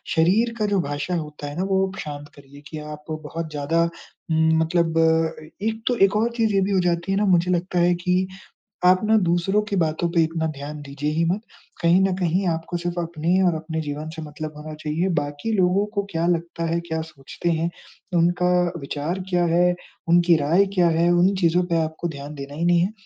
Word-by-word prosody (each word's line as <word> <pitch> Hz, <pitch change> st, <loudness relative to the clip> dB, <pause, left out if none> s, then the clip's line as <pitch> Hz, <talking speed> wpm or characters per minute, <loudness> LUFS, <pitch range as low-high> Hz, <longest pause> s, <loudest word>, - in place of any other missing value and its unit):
शरीर 200 Hz, +9 st, +3 dB
का 215 Hz, -, +2 dB
जो 195 Hz, -, +3 dB
भाषा 145 Hz, +4 st, -3 dB
होता 150 Hz, -3 st, -5 dB
है 145 Hz, -, -8 dB
ना 185 Hz, -, 0 dB
वो 190 Hz, 0 st, +2 dB
शांत 145 Hz, -1 st, -6 dB
करिए 140 Hz, 0 st, -15 dB
कि 155 Hz, -, -6 dB
आप 150 Hz, 0 st, -9 dB
बहुत 155 Hz, +1 st, -5 dB
ज़्यादा 150 Hz, +3 st, +1 dB, 0.5 s
म 160 Hz, 0 st, +3 dB
मतलब 165 Hz, 0 st, +1 dB, 0.4 s
ए 155 Hz, -, -13 dB, 0.2 s
एक 225 Hz, 0 st, -2 dB
तो 245 Hz, -, +3 dB
एक 195 Hz, -, -1 dB
और 225 Hz, +3 st, +2 dB
चीज़ 225 Hz, -3 st, +1 dB
ये 195 Hz, -, +3 dB
भी 195 Hz, +2 st, 0 dB
हो 190 Hz, -, +3 dB
जाती 175 Hz, +1 st, 0 dB
है 195 Hz, -, +1 dB
ना 210 Hz, -, +2 dB
मुझे 180 Hz, -2 st, +3 dB
लगता 180 Hz, 0 st, 0 dB
है 175 Hz, +1 st, +4 dB
कि 180 Hz, +1 st, +2 dB, 0.6 s
आप 185 Hz, +1 st, +6 dB
ना 220 Hz, +1 st, +4 dB
दूसरों 175 Hz, +5 st, +2 dB
की 200 Hz, -, -1 dB
बातों 165 Hz, 0 st, 0 dB
पे 165 Hz, -2 st, +4 dB
इतना 160 Hz, 0 st, -2 dB
ध्यान 145 Hz, +2 st, -7 dB
दीजिए 145 Hz, +1 st, -3 dB
ही 165 Hz, +2 st, +1 dB
मत। 180 Hz, +5 st, 0 dB, 0.4 s
कहीं 170 Hz, +2 st, +5 dB
न 190 Hz, -1 st, +2 dB
कहीं 185 Hz, +1 st, 0 dB
आपको 165 Hz, +1 st, -2 dB
सिर्फ़ 175 Hz, 0 st, -3 dB
अपने 170 Hz, +2 st, 0 dB
और 175 Hz, -, +3 dB
अपने 160 Hz, 0 st, -4 dB
जीवन 150 Hz, 0 st, -5 dB
से 160 Hz, -, -6 dB
मतलब 155 Hz, 0 st, -7 dB
होना 155 Hz, +1 st, -8 dB
चाहिए, 155 Hz, +4 st, -2 dB
बाकी 145 Hz, +4 st, -2 dB
लोगों 185 Hz, +2 st, +3 dB
को 200 Hz, -, +1 dB
क्या 165 Hz, +1 st, -1 dB
लगता 170 Hz, -1 st, -1 dB
है, 170 Hz, -, +1 dB
क्या 160 Hz, -1 st, -3 dB
सोचते 160 Hz, +2 st, -5 dB
हैं, 165 Hz, +1 st, 0 dB, 0.5 s
उनका 175 Hz, +1 st, +2 dB, 0.3 s
विचार 150 Hz, +6 st, -3 dB
क्या 175 Hz, -1 st, +2 dB
है? 180 Hz, +1 st, +4 dB, 0.3 s
उनकी 170 Hz, 0 st, +5 dB
राय 165 Hz, +7 st, +3 dB
क्या 175 Hz, -2 st, +4 dB
है? 170 Hz, +1 st, +3 dB
उन 180 Hz, +3 st, +4 dB
चीज़ों 175 Hz, 0 st, +3 dB
पे 170 Hz, -2 st, 0 dB
आपको 160 Hz, +2 st, -3 dB
ध्यान 145 Hz, -1 st, -7 dB
देना 140 Hz, 0 st, -8 dB
ही 165 Hz, +3 st, -2 dB
नहीं 175 Hz, 0 st, +4 dB
है, 185 Hz, +5 st, 0 dB
170 Hz, 215 wpm, -23 LUFS, 155-180 Hz, 0.6 s, आप